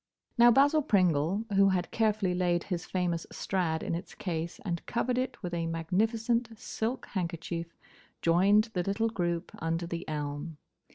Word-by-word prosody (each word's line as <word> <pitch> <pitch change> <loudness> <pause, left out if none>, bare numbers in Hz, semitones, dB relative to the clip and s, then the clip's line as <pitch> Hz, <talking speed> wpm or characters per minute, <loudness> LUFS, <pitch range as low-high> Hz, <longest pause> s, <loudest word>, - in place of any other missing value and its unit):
Now 240 0 +7
Basil 285 +6 +5
Pringle, 185 - +2
who 195 0 +5
had 185 -2 -1
carefully 215 -4 +1
laid 175 -1 +1
his 180 -3 -4
famous 175 -3 -1
Strad 170 -4 -1
in - - -2
its 170 +4 -5
case 170 -2 -4
and 170 -3 -2
covered 250 +1 0
it 255 -4 -4
with 175 -1 -4
a 165 -1 -1
magnificent 220 +7 0
silk 225 +3 -3
handkerchief, 170 -2 -3 0.5
joined 200 +6 +4
the 180 - 0
little 200 +5 0
group 175 -4 -2
under 165 +1 -1
the 170 -1 -5
elm. 150 +1 -4
180 Hz, 155 wpm, -30 LUFS, 170-220 Hz, 0.5 s, Now